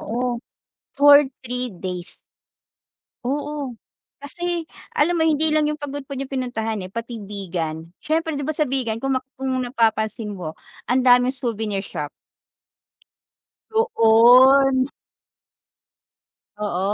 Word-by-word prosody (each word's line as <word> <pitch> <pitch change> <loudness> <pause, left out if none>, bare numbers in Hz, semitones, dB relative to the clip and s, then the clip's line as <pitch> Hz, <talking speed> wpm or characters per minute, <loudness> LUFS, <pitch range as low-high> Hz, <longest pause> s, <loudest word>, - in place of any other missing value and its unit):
Oo, 240 +2 -2 0.6
for 285 +1 +8 0.2
3 250 +1 -3
days. 180 -2 -7 1.1
Oo. 285 -1 -3 0.4
Kasi 345 +4 -4 0.3
alam 345 +4 +2
mo 320 - +3
hindi 310 0 +2
lang 305 -1 +2
yung 300 - -3
Pagudpud 280 -1 -6
yung 275 0 -5
pinuntahan 225 -5 -2
eh 185 - -7
pati 230 +2 -6
Vigan, 170 -5 -5
siyempre 320 +1 -1
'di 285 0 -3
ba 310 - -2
sa 305 - +2
Vigan 250 -5 -1
kung 270 +3 -1
map 260 - -28
kung 260 -1 -1
napapansin 220 -3 0
mo, 170 -5 -7 0.3
ang 255 +1 +2
daming 250 +1 +5
souvenir 220 -6 -3
shop. 150 -6 -5 1.6
Doon. 260 - +5 1.7
Oo. 205 -4 -2
250 Hz, 115 wpm, -22 LUFS, 220-285 Hz, 1.7 s, for